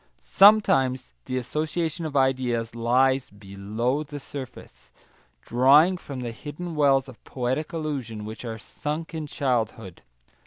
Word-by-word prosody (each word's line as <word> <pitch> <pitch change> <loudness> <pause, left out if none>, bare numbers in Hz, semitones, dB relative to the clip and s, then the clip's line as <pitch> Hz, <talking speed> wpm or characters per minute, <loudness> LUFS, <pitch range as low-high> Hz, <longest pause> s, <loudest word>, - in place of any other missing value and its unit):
Sometimes 135 - +4
the 130 -1 -3
association 155 +5 -2
of 145 -2 -3
ideas 125 -4 0
lies 130 +3 +2
below 105 +7 -3
the 145 -1 -7
surface, 135 -2 -10 0.5
drawing 140 +9 +5
from 140 -7 -7
the 120 -1 -4
hidden 150 +8 -7
wells 140 -3 +3
of 130 -3 -14
poetic 130 +4 -3
illusion 135 -10 -4
which 110 +3 -8
are 115 -2 -5
sunk 150 +8 -5
in 160 -2 -4
childhood. 115 - -2
130 Hz, 125 wpm, -25 LUFS, 115-150 Hz, 0.5 s, drawing